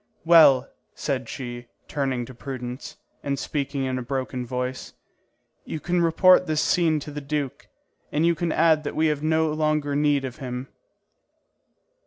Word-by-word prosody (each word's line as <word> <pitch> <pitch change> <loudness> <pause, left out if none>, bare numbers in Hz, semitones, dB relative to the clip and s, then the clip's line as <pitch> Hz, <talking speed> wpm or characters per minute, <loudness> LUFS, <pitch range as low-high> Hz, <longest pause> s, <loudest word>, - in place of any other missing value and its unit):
"Well," 160 -6 +7 0.3
said - - -3
she, 120 -1 -6 0.2
turning 135 -4 -2
to 130 - -11
Prudence, 125 0 -7 0.2
and 140 -1 -2
speaking 140 -1 -3
in 130 -1 -2
a - - -4
broken 130 0 -3
voice, 125 +1 -4 0.7
"you 160 - -5
can 175 +2 0
report 180 +2 +5
this 155 -1 +1
scene 160 -3 +2
to 150 - -8
the 145 0 -6
duke, 145 -1 -4 0.4
and 155 +3 +1
you 170 - +4
can 165 0 -2
add 160 -1 +3
that 145 - -4
we 160 - +2
have 145 - -8
no 160 0 +1
longer 155 -2 0
need 145 -2 +2
of 125 -2 -7
him." 125 0 -6
145 Hz, 160 wpm, -24 LUFS, 130-155 Hz, 0.7 s, Well